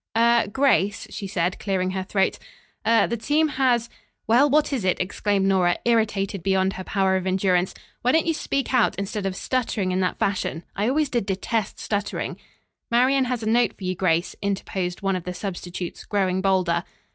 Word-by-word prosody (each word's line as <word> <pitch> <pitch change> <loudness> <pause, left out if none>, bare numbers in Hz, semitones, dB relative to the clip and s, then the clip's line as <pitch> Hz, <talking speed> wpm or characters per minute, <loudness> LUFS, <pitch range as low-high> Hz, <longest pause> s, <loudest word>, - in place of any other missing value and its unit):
"Er 235 -1 +4
Grace," 260 -6 +2
she 200 -2 -5
said, 180 -1 -1
clearing 185 -2 -1
her 190 0 -2
throat, 195 +1 0 0.5
"er 230 0 +5
the 235 - -2
team 295 +7 +1
has 250 -4 +1 0.2
" - - -47
"Well, 245 +6 +5
what 295 +1 +2
is 250 -7 -1
it?" 185 -1 +1
exclaimed 195 +2 0
Nora, 185 -2 +3
irritated 210 -5 +1
beyond 190 +1 +1
her 185 - -6
power 190 -1 +1
of 185 0 -3
endurance. 185 -1 +1 0.3
"Why 250 - +3
don't 320 +2 +3
you 330 - +1
speak 275 -3 -2
out, 250 -3 +3
instead 200 0 -3
of 190 - -3
stuttering 220 -5 -1
in 185 - 0
that 185 -1 0
fashion? 185 -4 -1
I 210 +4 +1
always 300 +1 +1
did 235 -6 -1
detest 210 +2 -2
stuttering." 205 -1 -3 0.5
"Marian 255 +3 +3
has 245 -2 -2
a - - -3
note 235 +2 +2
for - - -11
you, 185 0 -1
Grace," 175 -1 0
interposed 190 -2 -3
one 195 -1 +1
of 180 - -4
the 180 +1 -5
substitutes 180 -2 -5
growing 190 -2 0
bolder. 185 -3 +1
195 Hz, 190 wpm, -24 LUFS, 185-235 Hz, 0.5 s, er